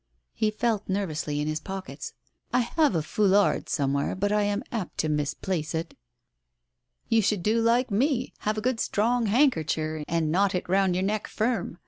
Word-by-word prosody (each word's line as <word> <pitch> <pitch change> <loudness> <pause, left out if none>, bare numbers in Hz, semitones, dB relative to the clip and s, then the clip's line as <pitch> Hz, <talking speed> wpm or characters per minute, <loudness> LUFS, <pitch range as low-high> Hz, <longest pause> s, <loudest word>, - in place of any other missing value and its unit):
H.e 215 - +2
felt 215 -1 -1
nervously 155 -6 -2
in 150 - -2
his 155 0 -1
pockets. 190 +3 -7 0.2
" - - -42
I 250 - +5
have 295 - +1
a 160 - +1
foulard 200 +3 +2
somewhere, 140 -2 0
but 205 +2 0
I 210 0 +3
am 205 +1 0
apt 220 -7 -4
to 155 - -1
mislay 150 +5 -1 0.2
it." 165 +1 -3 1.1
"You 225 0 +3
should 205 -3 0
do 225 +3 +2
like 235 +2 +2
me, 255 +4 +1
have 215 +1 -1
a - - -1
good 250 0 0
strong 230 +2 +1
handker 220 - +3
cher 155 -1 -2
and 160 -2 0
knot 195 +3 +2
it 180 - -2
round 190 0 +2
your 185 - 0
neck 210 +1 -1
firm. 225 -6 -1
200 Hz, 185 wpm, -26 LUFS, 165-225 Hz, 1.1 s, I